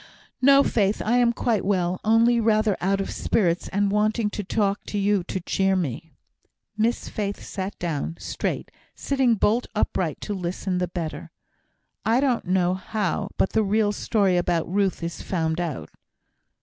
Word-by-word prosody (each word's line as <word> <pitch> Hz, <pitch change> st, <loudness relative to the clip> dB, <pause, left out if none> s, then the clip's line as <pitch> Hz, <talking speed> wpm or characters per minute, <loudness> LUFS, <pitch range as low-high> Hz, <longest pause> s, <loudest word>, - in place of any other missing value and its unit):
"No, 275 Hz, +1 st, +7 dB
Faith! 205 Hz, -5 st, +1 dB
I 235 Hz, +3 st, +3 dB
am 240 Hz, -1 st, +4 dB
quite 230 Hz, -3 st, 0 dB
well, 185 Hz, -2 st, 0 dB
only 230 Hz, +2 st, +4 dB
rather 215 Hz, -2 st, +2 dB
out 195 Hz, +2 st, +1 dB
of 195 Hz, -, -3 dB
spirits, 175 Hz, -5 st, 0 dB
and 200 Hz, 0 st, 0 dB
wanting 210 Hz, +1 st, +1 dB
to 210 Hz, -, -4 dB
talk 200 Hz, +1 st, 0 dB
to 210 Hz, -, -4 dB
you 200 Hz, -1 st, +2 dB
to 190 Hz, -, -3 dB
cheer 190 Hz, +2 st, +1 dB
me." 160 Hz, -2 st, -3 dB, 0.6 s
Miss 225 Hz, +3 st, 0 dB
Faith 205 Hz, -2 st, -4 dB
sat 195 Hz, +1 st, -5 dB
down, 165 Hz, -1 st, -3 dB
straight, -, -, -4 dB, 0.2 s
sitting 265 Hz, -4 st, +1 dB
bolt 225 Hz, +4 st, +1 dB
upright 180 Hz, -6 st, -1 dB
to 210 Hz, -, -3 dB
listen 180 Hz, 0 st, -2 dB
the 180 Hz, -, 0 dB
better. 170 Hz, -2 st, -5 dB, 0.7 s
"I 230 Hz, +3 st, +3 dB
don't 260 Hz, -4 st, +1 dB
know 180 Hz, -1 st, +2 dB
how, 190 Hz, -1 st, -2 dB
but -, -, +1 dB
the 220 Hz, -, +2 dB
real 210 Hz, +1 st, +2 dB
story 200 Hz, -3 st, +1 dB
about 175 Hz, -2 st, 0 dB
Ruth 195 Hz, -1 st, 0 dB
is 170 Hz, 0 st, -4 dB
found 160 Hz, -2 st, -1 dB
out." 165 Hz, -6 st, -4 dB
200 Hz, 160 wpm, -24 LUFS, 180-220 Hz, 0.7 s, No